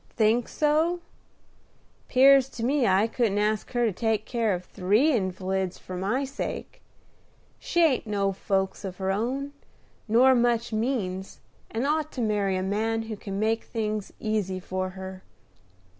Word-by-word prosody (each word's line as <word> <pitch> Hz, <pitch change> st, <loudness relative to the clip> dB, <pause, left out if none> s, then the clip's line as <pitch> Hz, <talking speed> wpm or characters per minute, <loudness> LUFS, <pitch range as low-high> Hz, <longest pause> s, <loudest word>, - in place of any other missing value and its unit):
"Think 225 Hz, +2 st, +3 dB
so? 315 Hz, +4 st, +1 dB, 1.1 s
'Pears 270 Hz, 0 st, +6 dB
to 230 Hz, -, -2 dB
me 270 Hz, -1 st, +2 dB
I 190 Hz, +2 st, +4 dB
couldn't 225 Hz, -3 st, 0 dB
ask 210 Hz, 0 st, 0 dB
her 240 Hz, -1 st, +2 dB
to 220 Hz, -, +2 dB
take 220 Hz, +2 st, -1 dB
care 230 Hz, -3 st, 0 dB
of 180 Hz, 0 st, -7 dB
three 210 Hz, -, +2 dB
invalids 190 Hz, -4 st, -1 dB
for 185 Hz, -, -8 dB
my 205 Hz, +9 st, 0 dB
sake. 275 Hz, +1 st, -6 dB, 0.8 s
She 345 Hz, -, +1 dB
ain't 270 Hz, -7 st, +2 dB
no 200 Hz, -2 st, 0 dB
folks 190 Hz, +1 st, -1 dB
of 185 Hz, -2 st, -6 dB
her 190 Hz, 0 st, -1 dB
own, 260 Hz, +8 st, -2 dB, 0.5 s
nor 245 Hz, +4 st, +6 dB
much 235 Hz, -2 st, +1 dB
means, 215 Hz, -5 st, -2 dB, 0.3 s
and 230 Hz, +4 st, -2 dB
ought 310 Hz, +1 st, 0 dB
to 255 Hz, -, -3 dB
marry 205 Hz, -4 st, +1 dB
a 185 Hz, -, -1 dB
man 220 Hz, +3 st, 0 dB
who 225 Hz, -1 st, -5 dB
can 195 Hz, -1 st, -5 dB
make 225 Hz, +1 st, +1 dB
things 215 Hz, -3 st, -3 dB
easy 210 Hz, -4 st, -1 dB
for 185 Hz, 0 st, -3 dB
her. 190 Hz, 0 st, -7 dB
220 Hz, 155 wpm, -26 LUFS, 195-245 Hz, 1.1 s, Pears